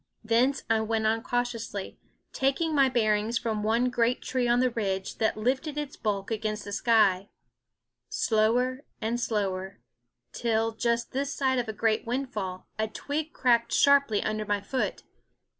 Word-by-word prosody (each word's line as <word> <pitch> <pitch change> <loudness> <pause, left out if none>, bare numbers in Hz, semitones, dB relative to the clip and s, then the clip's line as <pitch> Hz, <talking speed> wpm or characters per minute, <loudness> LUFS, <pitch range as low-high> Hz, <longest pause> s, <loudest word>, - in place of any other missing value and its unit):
Thence 240 +5 +2
I 220 -1 +2
went 220 0 -1
on 225 +1 +2
cautiously, 230 -5 -3 0.3
taking 275 +5 +1
my 275 -2 +4
bearings 220 -1 +1
from 220 -3 -2
one 230 +4 +1
great 245 0 +1
tree 255 -2 0
on 240 +1 +3
the 255 0 +2
ridge 195 -4 -3
that 220 -1 +1
lifted 265 +7 -1
its 295 -2 -4
bulk 200 -1 -2
against 215 -1 -2
the 205 - -7
sky; 200 -3 +3 0.8
slower 245 +5 +1 0.2
and 230 +2 -1
slower, 195 -5 -2 0.5
till, 225 -1 0
just 235 +1 -1
this 275 +2 -2
side 260 -2 +1
a 235 -3 -2
great 220 +1 0
windfall, 225 -8 -3
a 220 - +1
twig 295 +8 -4
cracked 235 -4 +2
sharply 280 -7 +4
under 215 0 -1
my 205 0 0
foot. 255 +6 -3
230 Hz, 150 wpm, -28 LUFS, 215-255 Hz, 0.8 s, my